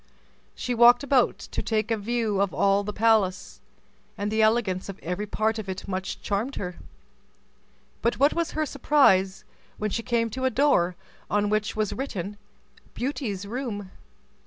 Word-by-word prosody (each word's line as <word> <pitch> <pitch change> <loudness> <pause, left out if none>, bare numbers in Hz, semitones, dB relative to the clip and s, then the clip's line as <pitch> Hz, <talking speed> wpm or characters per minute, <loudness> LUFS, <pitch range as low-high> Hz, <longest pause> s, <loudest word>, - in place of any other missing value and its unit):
She 250 - -3
walked 240 +2 +6
about 270 -3 +3
to - - -5
take 220 0 -1
a - - +3
view 220 -2 -1
of 190 -7 0
all 195 +5 +3
the 210 - -4
palace, 200 - +1 0.6
and 205 +1 -2
the 220 0 +2
elegance 215 -4 +1
of 195 - -6
every 180 +5 -3
part 220 +2 0
of 200 -3 -6
it 190 +1 -5
much 190 -1 -4
charmed 220 +7 -2
her. 180 -2 -5 1.2
But 235 - +1
what 285 +2 +4
was 335 -1 -2
her 310 0 0
surprise, 215 -10 +3 0.3
when 215 0 -2
she 230 - -1
came 230 -1 0
to 260 +3 -3
a - - +4
door 255 -11 +2 0.3
on 205 0 +1
which 215 0 0
was 215 -2 -1
written, 205 -7 -4 0.6
BEAUTY'S 240 -7 -3
ROOM! 205 -4 -5
215 Hz, 160 wpm, -26 LUFS, 195-240 Hz, 1.2 s, walked